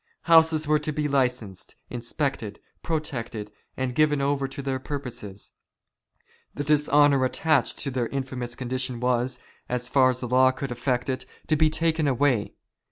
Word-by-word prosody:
Houses 160 -2 +5
were 150 0 +3
to 150 +1 -3
be 150 0 -1
licensed, 125 -8 -1 0.2
inspected, 120 -3 -3 0.2
protected, 120 -9 -4 0.3
and 130 -1 -1
given 150 +1 +3
over 140 0 0
to 135 +1 -7
their 135 -1 -2
purposes. 125 -8 -6 1.0
The 145 - -2
dishonour 145 -2 +4
attached 140 +1 +1
to 140 - -2
their 125 -2 -1
infamous 130 -3 -4
condition 130 -1 -3
was, 125 +1 0 0.3
so 125 - +1
far 130 +2 +3
as 125 -1 -1
the 125 - -4
law 130 +2 +5
could 135 0 -4
effect 125 +1 -1
it, 130 -1 -3 0.2
to 155 - +2
be 155 +1 +4
taken 160 -1 +1
away. 130 -4 +1
130 Hz, 155 wpm, -25 LUFS, 125-145 Hz, 1.0 s, Houses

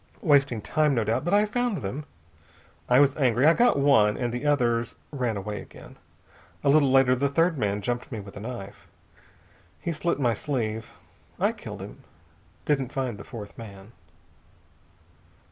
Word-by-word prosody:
Wasting 140 - +3
time, 155 -3 +1
no 115 - +1
doubt, 110 +2 0
but 175 - -1
I 210 +1 +4
found 220 - -2
them. 135 +10 -4 0.8
I 125 - +6
was 140 0 +4
angry. 130 -2 +2
I 160 - +7
got 240 0 +3
one, 110 -7 +4
and 120 -2 -2
the 125 +4 -3
others 120 -5 +1 0.2
ran 125 -7 -2
away 105 +1 -5
again. - - -14 0.7
A 140 - +3
little 140 -1 +5
later 135 -1 +5
the 140 +2 +1
third 165 +4 +2
man 105 -5 -1
jumped 120 +5 -3
me 115 - -4
with 100 -1 -11
a - - -7
knife. 105 -3 -8 0.9
He 170 - -3
slit 170 0 -1
my 120 -4 +2
sleeve. 110 -3 -3 0.5
I - - +3
killed - - -9
him. - - -11 0.6
Didn't 135 -4 0
find 125 -6 -3
the - - -8
fourth 105 -5 -9
man." 100 -2 -11
125 Hz, 165 wpm, -26 LUFS, 110-145 Hz, 0.9 s, I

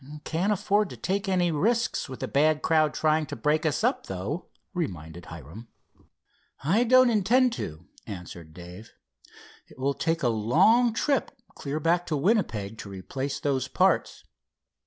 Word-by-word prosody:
"Can't 175 +6 0
afford 205 0 +1
to - - -9
take 195 +1 -2
any 180 -2 +2
risks 225 - 0
with 130 - -8
the - - -2
bad 150 +2 +2
crowd 155 -2 +3
trying 155 0 +1
to - - -6
break 150 +6 +1
us 150 +6 -1
up 250 +4 0
though," 100 - -4 0.3
reminded 85 - -5
Hiram. 80 - -10 1.0
"I 195 - +3
don't 255 0 +6
intend 235 +4 +3
to," 80 - -6 0.2
answered 85 -5 -9
Dave. 90 +6 -12 0.7
"It - - -18
will 135 +2 0
take 165 +2 -1
a - - +3
long 180 - +4
trip 275 +5 0 0.2
clear 145 +2 -4
back 170 +3 +1
to 155 - 0
Winnipeg 125 - 0
to 100 - -8
replace 130 +9 -5
those 140 -4 -1
parts. - - +1
155 Hz, 155 wpm, -27 LUFS, -, 1.0 s, don't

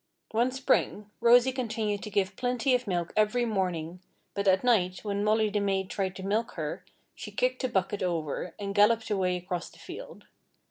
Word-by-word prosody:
One 235 +3 +2
Spring, 210 -5 0
Rosy 240 +2 +6
continued 220 -5 -2
to 215 - -6
give 190 -1 0
plenty 250 +2 +1
of 250 -2 +1
milk 175 -3 -2
every 215 +3 +2
morning, 180 -5 -2 0.3
but 200 0 -2
at 190 +2 +4
night, 190 -7 +2
when 205 -1 -1
Molly 215 0 +2
the 205 - +1
maid 195 -1 -1
tried 190 -2 -2
to 190 - -7
milk 215 +4 -1
her, - - -4 0.3
she - - -8
kicked - - 0
the 255 - 0
bucket 195 -1 -1
over 165 -1 -2
and 200 -1 -4
galloped 220 +2 +3
away 185 -3 +1
across 180 -1 -4
the - - -19
field. - - -10
205 Hz, 185 wpm, -28 LUFS, 190-230 Hz, 0.3 s, Rosy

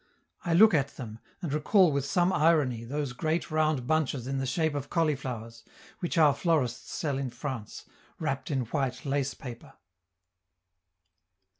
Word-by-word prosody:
I 170 -2 +1
look 215 +3 +7
at 140 -3 0
them, 115 -4 -7 0.2
and 155 -5 -2
recall 175 +4 +4
with 140 -1 0
some 175 +4 +2
irony 150 -7 +3
those 140 +1 -3
great 160 +6 -1
round 155 -4 +1
bunches 145 -4 0
in 135 +1 -2
the 135 - -2
shape 160 +3 0
of 145 -1 -4
cauliflowers, 130 -8 -2 0.4
which 175 -1 -2
our 150 -3 +6
florists 140 -6 0
sell 140 -4 -2
in 135 -2 -2
France, 120 -3 -6 0.3
wrapped 135 -4 -3
in 135 -4 0
white 125 +2 -2
lace 140 0 -1
paper! 120 -3 -9
140 Hz, 150 wpm, -29 LUFS, 125-155 Hz, 0.4 s, look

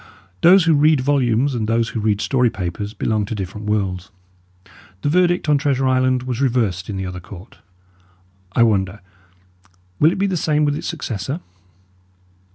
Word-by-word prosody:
Those 185 +2 +7
who 165 - +4
read 150 -1 +4
volumes 130 -1 +1
and 110 -3 -2
those 115 0 +1
who - - -4
read 105 -1 0
story 125 +3 +2
papers 100 0 -5
belong 110 +1 0
to 110 - -5
different 105 +2 -6
worlds. 95 -4 -2 0.9
The 145 - +1
verdict 175 +1 +2
on 145 -1 +3
Treasure 135 -3 0
Island 130 -1 +1
was 125 0 -3
reversed 110 -9 0
in 100 - -4
the 95 - -3
other 90 -1 -6
court; 90 +3 -13 0.9
I 120 - +4
wonder, 100 -3 0 1.0
will 155 +2 +5
it - - -4
be 195 - +1
the 190 -2 -1
same 150 -1 +1
with 145 0 0
its - - -5
successor? 135 - -4
120 Hz, 165 wpm, -20 LUFS, 105-145 Hz, 1.0 s, Those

